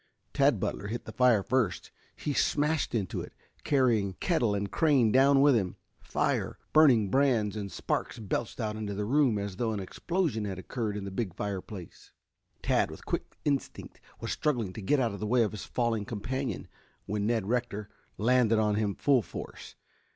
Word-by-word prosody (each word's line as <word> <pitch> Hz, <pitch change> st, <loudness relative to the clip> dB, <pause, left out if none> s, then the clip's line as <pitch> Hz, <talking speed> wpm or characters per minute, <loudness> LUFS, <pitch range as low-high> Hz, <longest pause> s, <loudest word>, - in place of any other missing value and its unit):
Tad -, -, +3 dB
Butler 100 Hz, -, -3 dB
hit 115 Hz, +3 st, -5 dB
the -, -, -7 dB
fire 125 Hz, -6 st, +4 dB
first. 110 Hz, -, 0 dB, 0.2 s
He 145 Hz, -, -3 dB
smashed 150 Hz, -1 st, +1 dB
into 100 Hz, -6 st, -2 dB
it, -, -, -9 dB, 0.3 s
carrying 120 Hz, -9 st, +2 dB
kettle 120 Hz, -, +1 dB
and 100 Hz, -1 st, -3 dB
crane 140 Hz, -9 st, +3 dB
down 135 Hz, +2 st, +5 dB
with 145 Hz, 0 st, +6 dB
him. 95 Hz, -5 st, 0 dB, 0.2 s
Fire, -, -, -1 dB, 0.2 s
burning 125 Hz, -11 st, +5 dB
brands 120 Hz, -6 st, +2 dB
and 100 Hz, -2 st, -4 dB
sparks -, -, -2 dB
belched 110 Hz, +2 st, -3 dB
out 110 Hz, -2 st, -2 dB
into 105 Hz, -2 st, -4 dB
the 105 Hz, +1 st, -2 dB
room 130 Hz, -2 st, +3 dB
as 100 Hz, -2 st, -4 dB
though 115 Hz, -2 st, 0 dB
an 105 Hz, -, -3 dB
explosion 135 Hz, -, -2 dB
had 95 Hz, -2 st, -4 dB
occurred 105 Hz, +2 st, -3 dB
in 100 Hz, -, -5 dB
the 100 Hz, -, -5 dB
big 95 Hz, -3 st, -3 dB
fireplace. 100 Hz, -3 st, -6 dB, 0.5 s
Tad -, -, +2 dB
with -, -, -11 dB
quick -, -, -4 dB
instinct 140 Hz, -2 st, -3 dB, 0.2 s
was -, -, -4 dB
struggling 120 Hz, -11 st, -1 dB
to 110 Hz, -, -7 dB
get 140 Hz, +9 st, +2 dB
out 115 Hz, -5 st, +1 dB
of 100 Hz, -, -7 dB
the 105 Hz, -, -3 dB
way 120 Hz, +1 st, +4 dB
of 105 Hz, -, -1 dB
his 105 Hz, -, -7 dB
falling 115 Hz, -4 st, -1 dB
companion, 125 Hz, +6 st, -4 dB, 0.4 s
when 105 Hz, 0 st, -1 dB
Ned 115 Hz, -4 st, 0 dB
Rector 115 Hz, -3 st, -1 dB, 0.3 s
landed 115 Hz, 0 st, +3 dB
on 105 Hz, -1 st, +2 dB
him 105 Hz, -2 st, 0 dB
full 140 Hz, -4 st, +3 dB
force. 85 Hz, -, -9 dB
110 Hz, 180 wpm, -29 LUFS, 100-130 Hz, 0.5 s, with